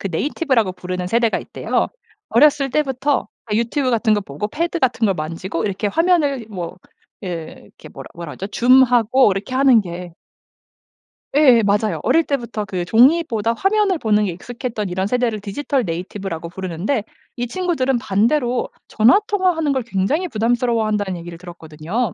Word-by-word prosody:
그 - - -4
네이티브 295 - -2
라고 220 -6 +2
부르는 180 0 -5
세대가 230 +1 +1
있대요. - - -2 0.4
어렸을 280 +1 +4
때부터 275 0 0 0.3
유튜브 235 +5 0
같은 225 -2 +2
거 205 - 0
보고 170 +1 -5
패드 335 +8 -2
같은 245 -6 +1
걸 195 - +1
만지고 165 +2 -4
이렇게 200 +1 -2
화면을 295 - +1
뭐 180 -4 -6 0.5
예 170 -4 -6
이렇게 - - -15
뭐라 - - -10
뭐라 170 -3 -7
하죠? 195 - -6
zoom 255 +4 +5
하고 245 -1 +3
이렇게 195 +5 -5
하는 265 -4 +5
게 175 -2 -7 1.2
예 260 -6 +6
맞아요. 205 +1 +1
어릴 330 - +3
때부터 235 -6 -3
그 185 -3 -3
종이보다 230 - +3
화면을 390 - +1
보는 210 -3 +2
게 185 - -2
익숙했던 225 +2 -5
이런 190 +2 -2
세대를 240 -2 0
디지털 250 +5 -2
네이티브 180 +3 -5
라고 170 -2 -5
부르는데 190 - -3 0.3
이 245 - -1
친구들은 270 -5 0
반대로 240 +3 0 0.2
전화 230 - +5
통화하는 365 -8 +1
걸 265 -2 -1
굉장히 235 - -1
부담스러워한다는 220 - 0
얘기를 170 0 -9
들었거든요. 175 +4 -5
225 Hz, 390 characters per minute, -20 LUFS, 190-265 Hz, 1.2 s, 예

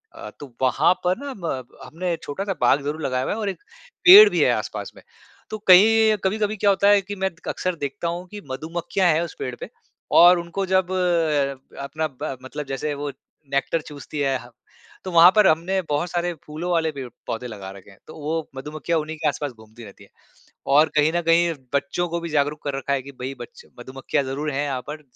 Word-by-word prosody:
अ, 330 0 -8
तो 135 -4 -11
वहाँ 135 +6 +3
पर 180 +3 +2
ना 280 - -5
म 160 -8 -4 0.2
हमने 175 +1 -3
छोटा-सा 195 +7 -3
बाग 130 +3 +4
ज़रूर 150 +3 -4
लगाया 130 -1 -1
हुआ - - -2
है 220 - -5
और 205 -2 -1
एक 195 - -7 0.4
पेड़ 410 +3 +11
भी - - -1
है - - +4
आस-पास - - -4
में, - - -16 0.5
तो 215 - -4
कहीं 215 +2 +6
कभी-कभी 210 +2 0
क्या 205 +1 +2
होता 200 +1 +3
है 205 -1 +5
कि 205 +2 -7
मैं 190 -1 -1 0.2
अक्सर 185 -1 -2
देखता 145 +2 -4
हूँ 175 +2 -4
कि 205 -1 -8
मधुमक्खियाँ 165 +6 -1
हैं 160 - +1
उस 170 - -5
पेड़ 125 -1 -4
पे - - -6 0.5
और 175 +1 +8
उनको 170 +3 -4
जब 185 -1 +1 0.9
अपना 155 +3 -3
ब 135 -1 -6
मतलब 145 +3 -6
जैसे 140 +2 -3
वो 145 0 -4 0.4
नेक्टर 145 +4 0
चूसती 150 0 -9
है 135 -2 +1
ह - - -17 0.6
तो 185 - -4
वहाँ 170 +1 +8
पर 210 -2 +6
हमने 180 +4 +1
बहुत 150 +4 -1
सारे 175 0 -1
फूलों 155 +4 -5
वाले 160 -2 +1
पेड़-पौधे 125 -2 -7
लगा 100 -4 -8
रखे 100 0 -14
हैं। 95 - -19
तो - - -11
वो 155 +2 -3
मधुमक्खियाँ 155 +4 -2
उन्हीं 155 +1 -5
के 155 - -1
आस-पास 145 0 -2
घूमती 110 0 -15
रहती 100 - -14
है - - -19 0.7
और 155 +2 +5
कहीं 150 +1 +3
न 175 - +1
कहीं 170 0 +4 0.2
बच्चों 140 +5 -1
को 170 +1 -2
भी 170 - -5
जागरूक 150 0 -1
कर 140 -2 -3
रखा 140 +1 -2
है 135 - 0
कि 140 +2 -11
भई 130 +2 -4
बच 475 0 -11 0.2
मधुमक्खियाँ 135 +1 -3
ज़रूर 145 +3 -3
हैं 140 +1 -1
यहाँ 135 -3 -3
पर, 155 +1 -6
155 Hz, 210 wpm, -23 LUFS, 140-185 Hz, 0.9 s, पेड़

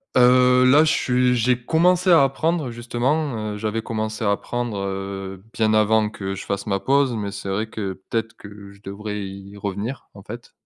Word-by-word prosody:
Heu, 125 0 +5
là, 145 +5 +6
je 160 - +2
suis 125 -2 +2
j'ai 125 +1 +1
commencé 180 +6 +2
à 165 -4 +7
apprendre, 150 +1 0
justement, 120 -1 -2
heu, 105 - -6
j'avais 110 +1 -2
commencé 110 0 -3
à 100 - +3
apprendre, 120 +1 -3
heu, 95 -1 -5
bien 110 -1 +1
avant 110 0 +3
que 95 -2 -5
je - - -8
fasse 100 +1 -3
ma 100 -1 -1
pause. 135 -2 +2
Mais 100 -2 -3
c'est 100 -1 -7
vrai 105 +3 -1
que, 100 -4 -4 0.2
peut-être 115 -1 -2
que 100 -1 -12
je 100 - -20
devrais 105 +1 -5
y 95 +1 -10
revenir, 100 +6 -5
en 100 - -12
fait. 120 +4 -10
110 Hz, 190 wpm, -22 LUFS, 100-125 Hz, 0.2 s, à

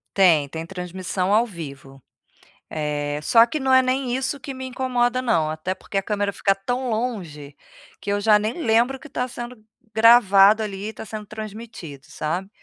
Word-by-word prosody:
Tem, 170 -7 +5
tem 160 +2 -6
transmissão 185 +1 -3
ao 225 +3 +4
vivo. 140 - -10 0.7
Eh, 150 -1 -2
só 230 +8 +6
que 300 +6 -4
não 265 -1 +1
é 260 - +7
nem 255 -1 -1
isso 270 +2 -2
que 270 +1 -7
me 260 0 -7
incomoda 255 -1 0
não, 165 -11 +1
até 155 +4 -3
porque 195 +2 -6
a - - +2
câmera 205 -1 -1
fica 195 -1 +1
tão 245 +6 -3
longe, 180 - -4 0.5
que 200 - -3
eu 205 - +1
já 210 0 +5
nem 225 +11 -3
lembro 235 +3 +2
o - - -25
que 300 - -13
tá 250 0 -2
sendo 240 -2 -8 0.3
gravado 220 -2 +6
ali 200 0 -5
e - - -8
tá - - -9
sendo 215 -1 -7
transmitido, 215 - -9
sabe. 180 +6 -3
210 Hz, 185 wpm, -23 LUFS, 180-245 Hz, 0.7 s, é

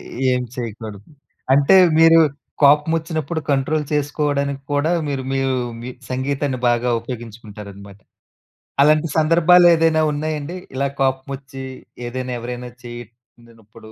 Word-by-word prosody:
ఎ - - -12 0.3
ఏం 125 0 0
చేయకూడదు. 110 -3 -6 0.5
అంటే, 140 +7 +5 0.2
మీరు 165 0 +7 0.4
కోపమొచ్చినప్పుడు 160 +2 +2
కంట్రోల్ 150 +3 0
చేసుకోవడానికి 140 -1 -1
కూడా 145 +3 +1 0.2
మీరు, 135 -2 -3
మీ 135 - 0
యూ 135 - 0 0.3
మీ 125 - -7 0.2
సంగీతాన్ని 135 0 -2
బాగా 120 +1 +1
ఉపయోగించుకుంటారనమాట. 105 -4 -10 0.8
అలాంటి 155 +2 +4
సందర్భాలేదైనా 165 0 +5
ఉన్నాయండి? 155 +2 -4 0.2
ఇలా 140 +1 0
కోపమొచ్చీ 135 0 -3 0.4
ఏదైనా, 130 +1 -5
ఎవరైనా 125 +1 -6
చేసినప్పుడు, 115 -2 -14
135 Hz, 105 wpm, -20 LUFS, 120-155 Hz, 0.8 s, మీరు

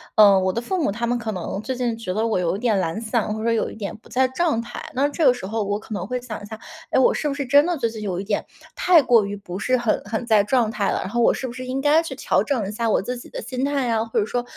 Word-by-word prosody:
嗯， 200 -3 +7
我 185 - +2
的 230 - -2
父 340 +9 -2
母 205 - +1
他 235 +4 -2
们 240 +1 0
可 225 -2 -3
能 185 +2 -4
最 255 +4 -3
近 245 -2 -1
觉 225 -5 -5
得 220 +1 +1
我 220 -5 +1
有 180 +1 0
一 - - -8
点 220 -4 +1
懒 165 +2 -2
散， 225 -1 -1
或 220 - -5
者 230 - +2
有 225 - 0
一 - - -10
点 205 -3 -5
不 220 - -20
在 260 +1 +2
状 310 -2 0
态。 235 +1 -6
那 275 +3 +3
这 305 +3 -2
个 265 - +7
时 245 - -7
候 220 +2 -2
我 205 +1 -2
可 215 - -9
能 190 -2 -4
会 250 +2 -2
想 235 -4 -7
一 - - -8
下， 220 +1 -8 0.3
诶， - - +1
我 260 - +5
是 300 - -2
不 285 - -1
是 280 -1 -3
真 285 +3 +6
的 350 -2 0
最 240 -4 0
近 220 -1 -7
有 190 -4 -3
一 - - -3
点 205 +1 -1 0.3
太 345 -5 +5
过 240 -4 +5
于 200 +1 -4
不 185 -2 -7
是 255 +4 +1
很 240 -3 0
很 220 +3 -3
在 215 -3 +4
状 235 0 +1
态 205 -3 -1
了？ - - 0
然 - - -5
后 240 +3 0
我 - - +5
是 - - -4
不 235 - -7
是 255 +1 -7
应 260 +1 -2
该 295 +3 +4
去 330 - -6
调 - - +1
整 245 -9 -1
一 - - -4
下 230 +2 -1
我 - - +3
自 250 +5 -3
己 - - -12
的 - - -6
心 255 +3 -4
态 280 -1 0
呀， 225 -2 +1
或 225 - -1
者 205 - +1
说 245 +2 -2
230 Hz, 355 characters per minute, -22 LUFS, 210-255 Hz, 0.3 s, 嗯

